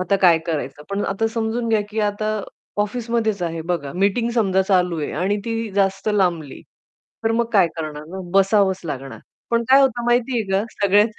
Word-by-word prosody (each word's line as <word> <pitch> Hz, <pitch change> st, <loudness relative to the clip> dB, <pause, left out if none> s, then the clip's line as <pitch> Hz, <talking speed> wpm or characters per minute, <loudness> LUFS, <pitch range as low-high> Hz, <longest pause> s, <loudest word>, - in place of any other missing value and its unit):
आता 185 Hz, +2 st, +1 dB
काय 175 Hz, -3 st, +6 dB
करायचं? 150 Hz, -2 st, -3 dB
पण 200 Hz, +1 st, -1 dB
आता 195 Hz, +3 st, 0 dB
समजून 230 Hz, +1 st, -1 dB
घ्या, 220 Hz, -1 st, +3 dB
की 220 Hz, +1 st, -2 dB
आता 215 Hz, +1 st, -1 dB, 0.4 s
ऑफिसमध्येच 220 Hz, -2 st, -1 dB
आहे 165 Hz, -1 st, -2 dB
बघा. 160 Hz, -5 st, -3 dB
मीटिंग 200 Hz, +5 st, +1 dB
समजा 190 Hz, -5 st, +2 dB
चालू 180 Hz, -3 st, +1 dB
आहे 145 Hz, -, -3 dB
आणि 185 Hz, +7 st, 0 dB
ती 225 Hz, -1 st, -3 dB
जास्त 195 Hz, +1 st, 0 dB
लांबली. 175 Hz, -8 st, 0 dB, 0.6 s
तर 225 Hz, -, +2 dB
मग 235 Hz, +1 st, +2 dB
काय 195 Hz, -5 st, +5 dB
करणार 155 Hz, -2 st, -5 dB
ना? 190 Hz, +2 st, -6 dB, 0.2 s
बसावंच 195 Hz, -1 st, +3 dB
लागणार. 135 Hz, -4 st, -6 dB, 0.3 s
पण 235 Hz, 0 st, +2 dB
काय 270 Hz, +1 st, +7 dB
होतं 245 Hz, -3 st, +2 dB
माहितीये 240 Hz, 0 st, +1 dB
का 195 Hz, +1 st, +2 dB
सगळ्यात 205 Hz, +2 st, +2 dB
200 Hz, 175 wpm, -21 LUFS, 180-225 Hz, 0.6 s, काय